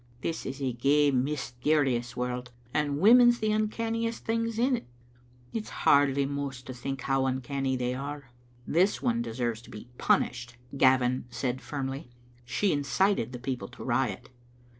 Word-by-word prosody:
This 165 Hz, -, -3 dB
is 135 Hz, +1 st, -5 dB
a 130 Hz, -2 st, 0 dB
gey 140 Hz, +4 st, +3 dB
mysterious 130 Hz, -1 st, 0 dB
world, 125 Hz, 0 st, -3 dB, 0.2 s
and 145 Hz, -2 st, 0 dB
women's 240 Hz, +5 st, +7 dB
the 215 Hz, -2 st, 0 dB
uncanniest 230 Hz, +2 st, -1 dB
things 230 Hz, 0 st, -1 dB
in't. 250 Hz, +1 st, +1 dB, 0.7 s
It's 220 Hz, -1 st, -4 dB, 0.2 s
hardly 140 Hz, -1 st, +5 dB
mous 140 Hz, -2 st, -4 dB
to 130 Hz, -, -7 dB
think 135 Hz, +1 st, -5 dB
how 135 Hz, 0 st, +1 dB
uncanny 130 Hz, +1 st, -1 dB
they 125 Hz, 0 st, -1 dB
are." 140 Hz, 0 st, -6 dB, 0.3 s
"This 185 Hz, +5 st, +2 dB
one 115 Hz, 0 st, +1 dB
deserves 115 Hz, -1 st, -2 dB
to -, -, -16 dB
be 105 Hz, +3 st, -10 dB
punished," 120 Hz, -1 st, +1 dB, 0.2 s
Gavin 130 Hz, -2 st, +3 dB
said, 125 Hz, +1 st, -3 dB
firmly; 135 Hz, -1 st, -5 dB, 0.2 s
" 120 Hz, 0 st, -29 dB
she 190 Hz, -, +1 dB
incited 145 Hz, -, +1 dB
the 125 Hz, -, -6 dB
people 125 Hz, -5 st, -4 dB
to -, -, -11 dB
riot. -, -, -1 dB
135 Hz, 150 wpm, -28 LUFS, 125-155 Hz, 0.7 s, women's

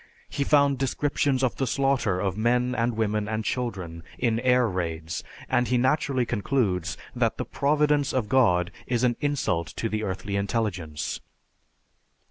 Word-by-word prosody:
He 140 Hz, -, -1 dB
found 140 Hz, -1 st, +3 dB
descriptions 135 Hz, 0 st, 0 dB
of 115 Hz, -7 st, 0 dB
the 135 Hz, -, 0 dB
slaughter 135 Hz, -8 st, +1 dB
of 95 Hz, -2 st, -1 dB
men 125 Hz, +3 st, +1 dB
and 115 Hz, -2 st, 0 dB
women 105 Hz, -1 st, 0 dB
and 110 Hz, 0 st, -2 dB
children 95 Hz, -10 st, -3 dB, 0.2 s
in 115 Hz, -2 st, +1 dB
air 125 Hz, -1 st, +3 dB
raids, 85 Hz, -4 st, -3 dB, 0.2 s
and 125 Hz, 0 st, +2 dB
he 125 Hz, -, +2 dB
naturally 130 Hz, 0 st, +1 dB
concludes 100 Hz, -6 st, 0 dB, 0.2 s
that -, -, +1 dB
the -, -, -3 dB
"providence 145 Hz, 0 st, +2 dB
of 125 Hz, -5 st, -1 dB
God" 90 Hz, -8 st, +3 dB, 0.2 s
is 120 Hz, -1 st, 0 dB
an 120 Hz, -1 st, +3 dB
insult 120 Hz, -, 0 dB
to 115 Hz, -, -1 dB
the 110 Hz, 0 st, -2 dB
earthly 100 Hz, 0 st, -3 dB
intelligence. 95 Hz, -8 st, -2 dB
115 Hz, 150 wpm, -26 LUFS, 95-130 Hz, 0.2 s, found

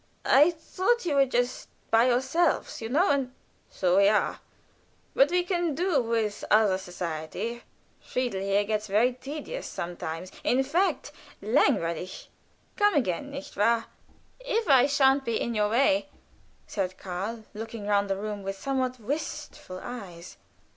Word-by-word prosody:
"I 290 Hz, +5 st, +6 dB
thought 370 Hz, +7 st, -1 dB
you 320 Hz, -, 0 dB
were 275 Hz, -1 st, +4 dB
just 245 Hz, 0 st, -1 dB, 0.2 s
by 230 Hz, +2 st, +5 dB
yourselves, 265 Hz, +8 st, +1 dB
you 225 Hz, -, -4 dB
know, 315 Hz, +9 st, +3 dB
and 270 Hz, -3 st, 0 dB, 0.2 s
" -, -, -38 dB
"So 180 Hz, 0 st, +1 dB
we 200 Hz, 0 st, +6 dB
are; 210 Hz, +1 st, +2 dB, 0.7 s
but 275 Hz, -, +5 dB
we 355 Hz, +1 st, +2 dB
can 345 Hz, -4 st, -1 dB
do 345 Hz, -4 st, +2 dB
with 225 Hz, -3 st, -1 dB
other 210 Hz, -3 st, +4 dB
society. 180 Hz, +6 st, -5 dB, 0.4 s
Friedel 245 Hz, -7 st, -2 dB
here 200 Hz, +1 st, +2 dB
gets 215 Hz, 0 st, -2 dB
very 220 Hz, +6 st, +3 dB
tedious 295 Hz, -, -6 dB
sometimes 170 Hz, 0 st, -5 dB
in 260 Hz, +2 st, +2 dB
fact, 325 Hz, +2 st, 0 dB, 0.3 s
langweilig. 185 Hz, -, 0 dB, 0.5 s
Come 415 Hz, -3 st, +3 dB
again, 250 Hz, -, 0 dB
nicht 280 Hz, 0 st, -8 dB
wahr?" 230 Hz, +2 st, +2 dB, 0.5 s
"If 470 Hz, -3 st, -1 dB
I 270 Hz, -2 st, +6 dB
sha'n't 275 Hz, -1 st, +3 dB
be 230 Hz, -3 st, -1 dB
in 235 Hz, -, -2 dB
your 210 Hz, -1 st, +1 dB
way," 290 Hz, +5 st, +2 dB, 0.6 s
said 185 Hz, -3 st, -3 dB
Karl, 195 Hz, +5 st, -5 dB
looking 225 Hz, 0 st, -7 dB
round 200 Hz, -1 st, +1 dB
the 195 Hz, -, 0 dB
room 205 Hz, 0 st, -4 dB
with 195 Hz, 0 st, -5 dB
somewhat 255 Hz, 0 st, -2 dB
wistful 225 Hz, -6 st, -5 dB
eyes. 185 Hz, -8 st, -8 dB
235 Hz, 145 wpm, -27 LUFS, 200-280 Hz, 0.7 s, I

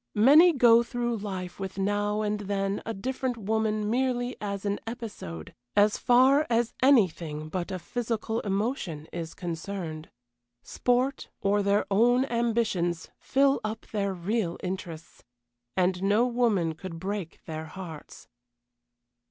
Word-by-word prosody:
Many 290 Hz, +11 st, +7 dB
go 235 Hz, -5 st, +6 dB
through 240 Hz, -1 st, -2 dB
life 190 Hz, -3 st, -6 dB
with 190 Hz, -1 st, -5 dB
now 205 Hz, +2 st, 0 dB
and 210 Hz, 0 st, -1 dB
then 200 Hz, 0 st, -2 dB
a -, -, -1 dB
different 255 Hz, +3 st, -3 dB
woman 215 Hz, 0 st, 0 dB
merely 245 Hz, +1 st, 0 dB
as 200 Hz, -1 st, -4 dB
an 200 Hz, 0 st, -1 dB
episode, 210 Hz, -, -7 dB, 0.2 s
as 205 Hz, +1 st, +4 dB
far 265 Hz, +5 st, +5 dB
as 235 Hz, 0 st, +1 dB
anything 170 Hz, -, +2 dB
but 175 Hz, +1 st, -3 dB
a 185 Hz, -, -3 dB
physical 225 Hz, +4 st, -3 dB
emotion 195 Hz, -, -2 dB
is 165 Hz, -2 st, -5 dB
concerned. 170 Hz, -2 st, -5 dB, 0.5 s
Sport, 250 Hz, +2 st, 0 dB
or 205 Hz, +1 st, +2 dB
their 200 Hz, +1 st, +2 dB
own 245 Hz, +6 st, +4 dB
ambitions, 225 Hz, -9 st, 0 dB
fill 275 Hz, 0 st, +2 dB
up 215 Hz, +1 st, -4 dB
their 200 Hz, -2 st, 0 dB
real 185 Hz, 0 st, -2 dB
interests, 175 Hz, -3 st, -6 dB, 0.5 s
and 180 Hz, 0 st, +2 dB
no 205 Hz, +5 st, +3 dB
woman 230 Hz, -9 st, +1 dB
could 165 Hz, +1 st, -8 dB
break 190 Hz, -1 st, -5 dB
their 160 Hz, -1 st, -5 dB
hearts. 160 Hz, -2 st, -10 dB
205 Hz, 130 wpm, -27 LUFS, 185-235 Hz, 0.5 s, Many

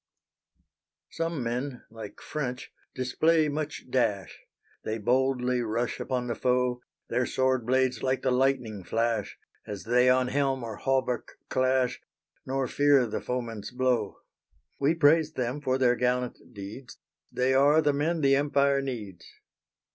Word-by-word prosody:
_ -, -, -14 dB
Some 165 Hz, -5 st, -2 dB
men, 125 Hz, +2 st, -3 dB
like 110 Hz, -2 st, -9 dB
French, 125 Hz, -5 st, -4 dB, 0.2 s
display 155 Hz, +5 st, +2 dB
much 150 Hz, +1 st, -4 dB
dash; 105 Hz, -8 st, 0 dB, 0.4 s
They 110 Hz, -, -2 dB
boldly 125 Hz, +2 st, +1 dB
rush 115 Hz, +1 st, -2 dB
upon 125 Hz, -1 st, -2 dB
the 120 Hz, -, -2 dB
foe, 125 Hz, 0 st, 0 dB, 0.3 s
Their 125 Hz, +1 st, 0 dB
sword 130 Hz, -2 st, 0 dB
blades 130 Hz, -2 st, +2 dB
like 130 Hz, -1 st, 0 dB
the 130 Hz, -, +2 dB
lightning 125 Hz, -6 st, 0 dB
flash, 115 Hz, 0 st, -1 dB, 0.3 s
As 100 Hz, -2 st, -6 dB
they 125 Hz, +2 st, +3 dB
on 125 Hz, 0 st, +3 dB
helm 135 Hz, -2 st, 0 dB
or 110 Hz, -2 st, -6 dB
hauberk 130 Hz, -2 st, -1 dB
clash; 130 Hz, -1 st, +1 dB, 0.5 s
Nor 135 Hz, 0 st, -1 dB
fear 145 Hz, -2 st, +4 dB
the 110 Hz, -, -4 dB
foeman's 115 Hz, -4 st, -4 dB
blow. 125 Hz, -5 st, 0 dB, 0.6 s
We 145 Hz, +4 st, +2 dB
praise 160 Hz, 0 st, +4 dB
them 130 Hz, +1 st, -2 dB
for 130 Hz, -2 st, +1 dB
their 125 Hz, -2 st, +3 dB
gallant 125 Hz, 0 st, -1 dB
deeds; 110 Hz, +5 st, -9 dB, 0.3 s
They 130 Hz, +1 st, +1 dB
are 145 Hz, +3 st, +5 dB
the 145 Hz, -2 st, +2 dB
men 155 Hz, +3 st, 0 dB
the 135 Hz, -1 st, +4 dB
Empire 140 Hz, -1 st, +2 dB
needs. 105 Hz, -10 st, -6 dB
125 Hz, 140 wpm, -28 LUFS, 120-135 Hz, 0.6 s, are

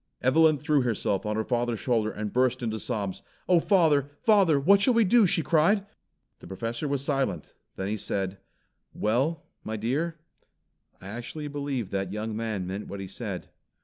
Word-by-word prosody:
Evelyn 155 Hz, +4 st, +5 dB
threw 150 Hz, 0 st, +2 dB
herself 105 Hz, -4 st, -1 dB
on 105 Hz, -, -1 dB
her 110 Hz, -, 0 dB
father's 120 Hz, -1 st, -1 dB
shoulder 115 Hz, -4 st, +1 dB
and 105 Hz, -1 st, -5 dB
burst 125 Hz, 0 st, +1 dB
into 110 Hz, -1 st, -2 dB
sobs. 100 Hz, -5 st, -3 dB, 0.3 s
"Oh, 180 Hz, -2 st, +5 dB
father, 160 Hz, -7 st, +3 dB
father, 195 Hz, -9 st, +5 dB
what 195 Hz, +8 st, +5 dB
shall 245 Hz, +3 st, +4 dB
we 230 Hz, -, +5 dB
do?" 215 Hz, +1 st, +5 dB
she 165 Hz, -, +1 dB
cried. 180 Hz, +7 st, +3 dB, 0.5 s
The -, -, -12 dB
Professor 115 Hz, -, -4 dB
was 140 Hz, -1 st, -1 dB
silent, 135 Hz, -, -1 dB, 0.2 s
then 95 Hz, -, -3 dB
he 105 Hz, +2 st, -2 dB
said, 95 Hz, -1 st, -3 dB, 0.6 s
"Well, 135 Hz, +9 st, 0 dB, 0.2 s
my 110 Hz, 0 st, -4 dB
dear, 150 Hz, +10 st, -2 dB, 0.8 s
I -, -, -14 dB
actually 125 Hz, +7 st, -6 dB
believe 140 Hz, -7 st, -3 dB
that 95 Hz, -1 st, -2 dB
young 105 Hz, +1 st, -4 dB
man 110 Hz, -4 st, -3 dB
meant 95 Hz, +3 st, -5 dB
what 100 Hz, -, -7 dB
he 95 Hz, -, -5 dB
said." 95 Hz, -1 st, -6 dB
120 Hz, 175 wpm, -27 LUFS, 105-155 Hz, 0.8 s, Evelyn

